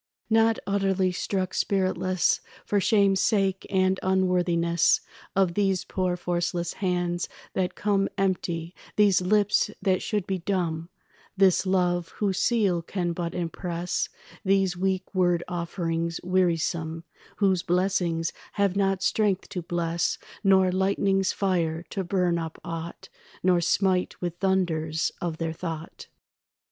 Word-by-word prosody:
Not 225 Hz, 0 st, +4 dB
utterly 195 Hz, -2 st, +1 dB
struck 185 Hz, 0 st, -2 dB
spiritless 185 Hz, -2 st, +1 dB, 0.2 s
For 205 Hz, -, +1 dB
shame's 200 Hz, -2 st, +3 dB
sake 195 Hz, -3 st, +1 dB
and 190 Hz, -1 st, +2 dB
unworthiness 180 Hz, -3 st, +2 dB, 0.3 s
Of 190 Hz, -3 st, +3 dB
these 195 Hz, -1 st, +1 dB
poor 185 Hz, -1 st, -1 dB
forceless 175 Hz, -1 st, -1 dB
hands 175 Hz, -2 st, 0 dB, 0.2 s
that 180 Hz, -1 st, -1 dB
come 200 Hz, -1 st, +1 dB
Empty, 175 Hz, -3 st, -1 dB, 0.2 s
these 200 Hz, -3 st, +4 dB
lips 205 Hz, +2 st, +2 dB
that 190 Hz, -2 st, +1 dB
should 210 Hz, -4 st, -1 dB
be 190 Hz, -1 st, -2 dB
dumb, 170 Hz, -3 st, -2 dB, 0.5 s
This 190 Hz, 0 st, +4 dB
love 175 Hz, -2 st, +1 dB
whose 195 Hz, -3 st, 0 dB
seal 200 Hz, -8 st, +2 dB
can 175 Hz, 0 st, -2 dB
but 170 Hz, 0 st, -4 dB
impress 175 Hz, 0 st, -2 dB, 0.3 s
These 195 Hz, -2 st, +2 dB
weak 190 Hz, +1 st, -1 dB
word 175 Hz, -2 st, +2 dB
offerings 170 Hz, -1 st, -2 dB
wearisome 170 Hz, -3 st, 0 dB, 0.3 s
Whose 190 Hz, -3 st, +2 dB
blessings 175 Hz, -2 st, 0 dB, 0.2 s
have 200 Hz, -2 st, +1 dB
not 195 Hz, -1 st, +1 dB
strength 205 Hz, -4 st, +1 dB
to 180 Hz, -, -4 dB
bless 170 Hz, 0 st, -1 dB, 0.3 s
Nor 190 Hz, -2 st, +5 dB
lightnings 195 Hz, 0 st, +1 dB
fire 170 Hz, -4 st, 0 dB
to 195 Hz, -, -2 dB
burn 180 Hz, -2 st, +1 dB
up 165 Hz, -1 st, -6 dB
aught 165 Hz, 0 st, -6 dB, 0.3 s
Nor 180 Hz, -1 st, +4 dB
smite 185 Hz, +1 st, +1 dB
with 175 Hz, -1 st, -4 dB
thunders 170 Hz, -5 st, 0 dB
of 170 Hz, -2 st, -2 dB
their 165 Hz, -1 st, -2 dB
thought. 165 Hz, -1 st, -6 dB
185 Hz, 125 wpm, -26 LUFS, 170-195 Hz, 0.5 s, Nor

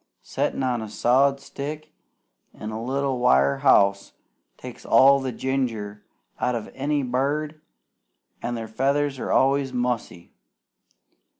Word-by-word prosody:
Settin' -, -, -2 dB
on 125 Hz, -2 st, 0 dB
a 110 Hz, -, -6 dB
sawed 135 Hz, +5 st, +2 dB
stick 150 Hz, +3 st, -7 dB, 0.6 s
in 110 Hz, -, -7 dB
a 110 Hz, +1 st, -5 dB
little 135 Hz, +1 st, -1 dB
wire 70 Hz, -, +3 dB
house 100 Hz, 0 st, +3 dB, 0.4 s
takes -, -, -10 dB
all 140 Hz, +1 st, +5 dB
the 135 Hz, -1 st, -3 dB
ginger 115 Hz, -5 st, -3 dB, 0.4 s
out 125 Hz, -, 0 dB
of 115 Hz, -, -6 dB
any 145 Hz, +1 st, -1 dB
bird, 145 Hz, +5 st, -2 dB, 0.8 s
an' 120 Hz, -, -3 dB
their 115 Hz, -1 st, -5 dB
feathers 135 Hz, +4 st, 0 dB
are -, -, -3 dB
always 135 Hz, 0 st, +2 dB
mussy. 120 Hz, -8 st, -3 dB
130 Hz, 125 wpm, -24 LUFS, 115-140 Hz, 0.8 s, all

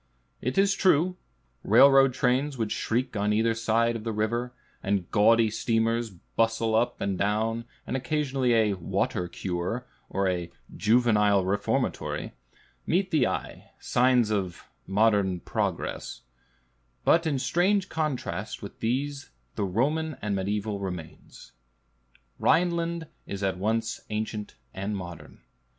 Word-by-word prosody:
It 125 Hz, +2 st, -2 dB
is 195 Hz, 0 st, +4 dB
true, 180 Hz, -1 st, +3 dB, 0.5 s
railroad 135 Hz, -1 st, +6 dB
trains 130 Hz, +2 st, +1 dB
would 110 Hz, -3 st, -2 dB
shriek 120 Hz, +2 st, -1 dB
on 105 Hz, 0 st, +1 dB
either 115 Hz, +2 st, +2 dB
side 115 Hz, +1 st, +1 dB
of 110 Hz, -, -5 dB
the 115 Hz, -, -2 dB
river, 115 Hz, +3 st, -1 dB, 0.3 s
and 95 Hz, -2 st, -1 dB
gaudy 110 Hz, +1 st, +4 dB
steamers 115 Hz, +1 st, 0 dB
bustle 115 Hz, +4 st, -1 dB
up 115 Hz, +2 st, +1 dB
and 100 Hz, -2 st, -2 dB
down, 110 Hz, +3 st, 0 dB, 0.2 s
and -, -, -3 dB
occasionally 135 Hz, -1 st, 0 dB
a 110 Hz, -2 st, +3 dB
"water 90 Hz, 0 st, -1 dB
cure" 90 Hz, +7 st, -3 dB, 0.2 s
or 100 Hz, 0 st, 0 dB
a 90 Hz, -2 st, -2 dB, 0.2 s
"juvenile 105 Hz, -3 st, +3 dB
reformatory" 100 Hz, +2 st, -1 dB, 0.5 s
meet 185 Hz, +3 st, +1 dB
the 155 Hz, -6 st, +3 dB
eye, -, -, -5 dB
signs 125 Hz, -3 st, +3 dB
of 95 Hz, -5 st, -2 dB, 0.2 s
modern 100 Hz, -2 st, +2 dB
progress; -, -, -3 dB, 0.8 s
but 165 Hz, 0 st, +4 dB
in 145 Hz, -3 st, +1 dB
strange 180 Hz, +9 st, +2 dB
contrast 135 Hz, -, -3 dB
with 100 Hz, -, -9 dB
these 140 Hz, +5 st, -2 dB, 0.2 s
the 100 Hz, -, -1 dB
Roman 145 Hz, -, 0 dB
and 105 Hz, -1 st, -2 dB
mediæval 100 Hz, +1 st, -2 dB
remains. 90 Hz, -5 st, -8 dB, 0.9 s
Rhineland 170 Hz, -1 st, +1 dB, 0.2 s
is 100 Hz, 0 st, -5 dB
at 95 Hz, -1 st, -1 dB
once 115 Hz, +3 st, -1 dB
ancient 105 Hz, 0 st, -4 dB, 0.2 s
and 100 Hz, +2 st, -3 dB
modern. 85 Hz, -3 st, -9 dB
115 Hz, 125 wpm, -27 LUFS, 100-130 Hz, 0.9 s, railroad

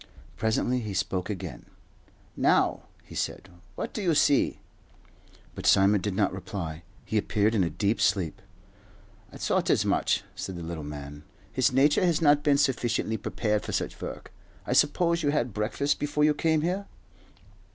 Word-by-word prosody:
Presently 115 Hz, +3 st, 0 dB
he 105 Hz, -4 st, -5 dB
spoke 95 Hz, 0 st, -1 dB
again. 100 Hz, -4 st, -6 dB, 0.7 s
"Now," -, -, +2 dB, 0.2 s
he -, -, -14 dB
said, 90 Hz, -, -4 dB, 0.3 s
"what -, -, -5 dB
do 215 Hz, -, -3 dB
you 170 Hz, -5 st, +2 dB
see?" 145 Hz, -1 st, +3 dB, 1.0 s
But -, -, -4 dB
Simon 100 Hz, +1 st, +5 dB
did 100 Hz, 0 st, -2 dB
not 100 Hz, -1 st, +1 dB
reply. 90 Hz, -4 st, -5 dB, 0.2 s
He 110 Hz, -, +1 dB
appeared 105 Hz, +1 st, +1 dB
in 105 Hz, -4 st, +3 dB
a 85 Hz, -, 0 dB
deep 100 Hz, +7 st, -1 dB
sleep. 90 Hz, -6 st, +1 dB, 0.9 s
"I -, -, -10 dB
thought -, -, 0 dB
as -, -, +3 dB
much," -, -, +1 dB
said 95 Hz, -, -5 dB
the 85 Hz, -, -6 dB
little 80 Hz, -2 st, -5 dB
man. 75 Hz, 0 st, -8 dB, 0.3 s
"His 130 Hz, -1 st, +2 dB
nature 145 Hz, +7 st, +4 dB
has 170 Hz, -4 st, +2 dB
not 145 Hz, -2 st, +4 dB
been 145 Hz, -2 st, +3 dB
sufficiently 120 Hz, -5 st, 0 dB
prepared 105 Hz, +1 st, -1 dB
for -, -, -5 dB
such -, -, -3 dB
work. -, -, -7 dB, 0.3 s
I -, -, -1 dB
suppose 170 Hz, +2 st, +3 dB
you 145 Hz, -, +1 dB
had 125 Hz, -6 st, 0 dB
breakfast 110 Hz, +7 st, -1 dB
before 150 Hz, 0 st, 0 dB
you 150 Hz, 0 st, +5 dB
came 160 Hz, +1 st, +1 dB
here?" 185 Hz, +4 st, -1 dB
110 Hz, 165 wpm, -27 LUFS, 95-145 Hz, 1.0 s, Simon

